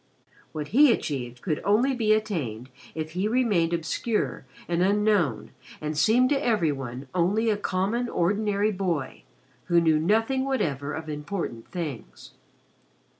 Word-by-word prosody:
What 150 -1 -5
he 285 +2 +6
achieved 125 - -3
could 155 -5 -1
only 235 +7 +3
be 225 -4 +1
attained 140 - -1 0.2
if 155 0 -4
he 185 +5 -1
remained 215 -8 +2
obscure 170 +7 -2 0.2
and 175 0 0
unknown 200 - +1 0.3
and 155 0 -3
seemed 230 - +4
to 285 0 +1
every 210 -10 +2
one 135 -1 -6
only 200 +6 +2
a - - +2
common 205 +5 -1
ordinary 205 +3 +1
boy 180 -8 -2 0.4
who 170 -1 +4
knew 160 -2 +3
nothing 225 - +1
whatever 150 - -1
of 160 0 -6
important 150 - -5
things. 135 - -7
180 Hz, 135 wpm, -26 LUFS, 150-215 Hz, 0.4 s, he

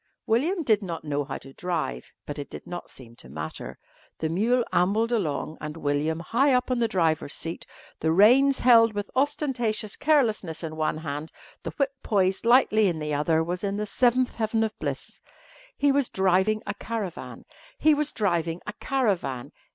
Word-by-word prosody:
William 320 - +1
did 220 -6 +3
not 170 -4 -5
know 145 -1 -1
how 140 -1 -5
to 135 - -13
drive, 160 - -3
but 145 0 -6
it 145 - -6
did - - -9
not 175 0 -7
seem 120 -3 -13
to 65 - -14
matter. 75 +3 -6 0.4
The 160 - -2
mule 230 +9 +2
ambled 210 +6 +2
along 160 -7 -2
and 150 +1 -6
William, 150 +2 -1
high 265 +9 +2
up 250 +1 0
on 250 - +1
the 230 - +2
driver's 165 -7 0
seat, 165 +1 -6 0.3
the 160 - +1
reins 255 +10 +5
held 230 -2 +6
with 205 0 -4
ostentatious 250 -7 -1
carelessness 220 - +1
in 155 -1 -5
one 155 -1 -1
hand, 155 0 -5 0.3
the - - -5
whip 275 -1 +1
poised 195 0 +1
lightly 220 -4 +5
in 170 -3 -1
the 150 -1 -3
other 160 +2 +2
was 175 +3 -4
in 200 0 -1
the 210 - -2
seventh 250 +3 +2
heaven 225 0 0
of 220 -1 -2
bliss. - - -5 0.6
He 285 0 +3
was 275 -2 +1
driving 190 +3 +2
a 205 - -3
caravan. 210 -4 -6 0.3
He 310 - +4
was 300 0 0
driving 170 -5 -1
a 210 - -5
caravan. 190 - -1
200 Hz, 180 wpm, -26 LUFS, 160-235 Hz, 0.6 s, held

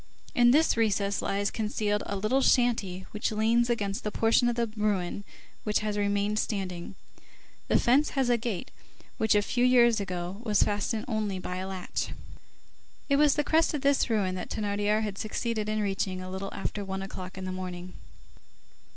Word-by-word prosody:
In 240 0 +5
this 305 +6 +4
recess 200 -3 +1
lies 200 +1 -1
concealed 210 -1 -1
a 200 - -2
little 215 +7 +1
shanty 220 -8 +2
which 210 +2 -2
leans 230 +3 +2
against 205 -4 -1
the 210 - -1
portion 225 +3 +3
of 240 - -1
the 235 0 +1
ruin 205 -2 -1 0.4
which 210 -1 +1
has 210 -1 -2
remained 205 +1 0
standing. 185 -6 -3 0.7
The - - +3
fence 270 +5 +3
has 265 -2 +3
a 245 - +4
gate, 225 -5 -4 0.5
which, 220 -1 +3
a 205 - +4
few 245 +4 0
years 240 -3 +5
ago, 180 -1 -4
was 210 -4 +3
fastened 210 +2 -1
only 215 -4 -1
by 180 0 -5
a 185 +1 -4
latch. 190 -2 -4 1.0
It 280 - +4
was 295 -1 +5
the 295 - +1
crest 320 +1 +2
of 290 - -3
this 280 -2 +3
ruin 200 -5 +1
that 180 -1 -5
Thénardier 205 +1 0
had 205 -2 -4
succeeded 215 0 -2
in 215 0 0
reaching, 195 -2 -1
a 185 0 -7
little 190 +1 -5
after 205 +1 -4
one 190 0 -4
o'clock 185 -1 -8
in 190 - -5
the 185 - -3
morning. 180 -1 -6
210 Hz, 180 wpm, -28 LUFS, 195-235 Hz, 1.0 s, In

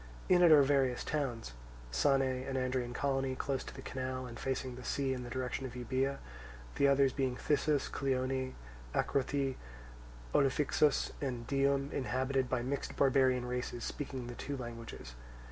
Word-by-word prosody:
In 180 -1 +6
it 175 -2 +7
are 150 -2 +9
various 135 -3 +2
towns, 125 - -2 0.4
Sane, 135 - +3
an 130 +1 -2
Andrian 130 -1 -1
colony, 135 0 0
close 135 0 -2
to - - -8
the - - -9
canal, 130 0 -4
and 120 -1 -8
facing 130 -1 -2
the 125 +1 -9
sea 135 +1 0
in 125 - -4
the 120 - -7
direction 130 +1 -3
of 125 - -10
Euboea; 130 +3 -1 0.6
the 140 - +3
others 140 -1 +4
being 130 -3 0
Thyssus, 145 +1 +1
Cleone, 130 -1 -1 0.4
Acrothoi, 135 -1 0 0.8
Olophyxus, 145 +1 +3
and 125 -4 -3
Dium, 140 +1 +1
inhabited 130 0 0
by 125 -2 0
mixed 140 +3 -3
barbarian 130 -2 +3
races 125 -1 -3
speaking 135 -3 -4
the 120 - -6
two 140 +3 -5
languages. 115 - -7
130 Hz, 155 wpm, -33 LUFS, 125-140 Hz, 0.8 s, are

